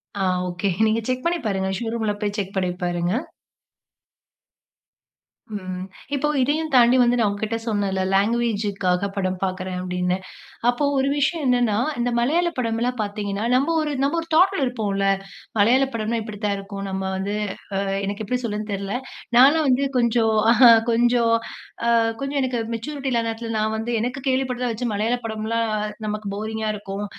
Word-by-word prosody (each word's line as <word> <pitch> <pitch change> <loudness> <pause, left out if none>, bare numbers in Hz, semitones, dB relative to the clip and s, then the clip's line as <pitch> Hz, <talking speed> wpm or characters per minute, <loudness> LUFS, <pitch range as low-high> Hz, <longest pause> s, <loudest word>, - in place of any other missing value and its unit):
ஆ 195 -1 0 0.2
okay. 180 +3 -1 0.2
நீங்க 220 +1 +1
check 255 +2 -2
பண்ணி 340 0 +1
பாருங்க. 190 -2 -1
ஷோ 235 - -4
ரூம்ல 220 -2 0
போய் 205 -1 -1
செக் 200 -1 -4
பண்ணிப்பாருங்க. 180 -1 -1 2.4
ம். 185 -2 -5 0.3
இப்போ 280 +2 0
இதையும் 305 +4 0
தாண்டி 245 0 +6
வந்து 245 0 +3
நான் 220 -3 +3
உங்கக்கிட்ட 215 +2 -2
சொன்னேன்ல. 200 -4 0
லாங்குவேஜ்க்காக 200 -3 +1
படம் 185 -2 -1
பார்க்கிறேன் 185 -1 -3
அப்பிடின்னு. 180 0 -1 0.5
அப்போ 245 +4 +1
ஒரு 270 +1 +2
விஷயம் 300 +2 0
என்னன்னா, 245 -4 +2 0.2
இந்த 240 +1 +1
மலையாள 320 +9 +2
படம்லாம் 235 +1 -1
பார்த்தீங்கன்னா, 205 0 -3
நம்ம 280 +6 +2
ஒரு, 300 -1 -2
நம்ம 285 +4 +1
ஒரு 330 - -10
தாட்ல 370 +2 +4
இருப்போம்ல. 205 -5 -1 0.5
மலையாள 245 +6 +5
படம்ன்னா 230 +1 -1
இப்பிடி 215 -2 -8
தான் 200 -1 +1
இருக்கும். 195 0 -7
நம்ம 190 0 -3
வந்து 200 +2 -2 0.4
அ - - +1 0.3
எனக்கு 200 +2 -3
எப்பிடி 250 +4 -1
சொலறதுன்னு 210 -1 -3
தெரில. 195 0 -3 0.4
நான்லாம் 290 +4 +6
வந்து 255 +2 +3
கொஞ்சம் 235 -2 +2 0.3
ஆஹா! 245 -3 +10 0.2
கொஞ்சம், 235 0 +3 0.5
அ - - +4 0.3
கொஞ்சம் 275 +1 -1
எனக்கு 255 -2 -1 0.2
மேச்சூரிட்டி 275 +3 -4
இல்லாத 230 -1 +1
நேரத்தில 225 0 -4
நான் 215 +1 0
வந்து 225 +2 -3
எனக்கு 250 +4 -2
கேள்விப்பட்டத 255 -1 0
வச்சு 240 +2 -3
மலையாள 220 +4 0
படம்லாம் 225 +1 -1 0.4
நமக்கு 210 0 -4
போரிங்கா 220 +1 -3
இருக்கும். 200 0 -5
225 Hz, 155 wpm, -23 LUFS, 200-250 Hz, 2.4 s, ஆஹா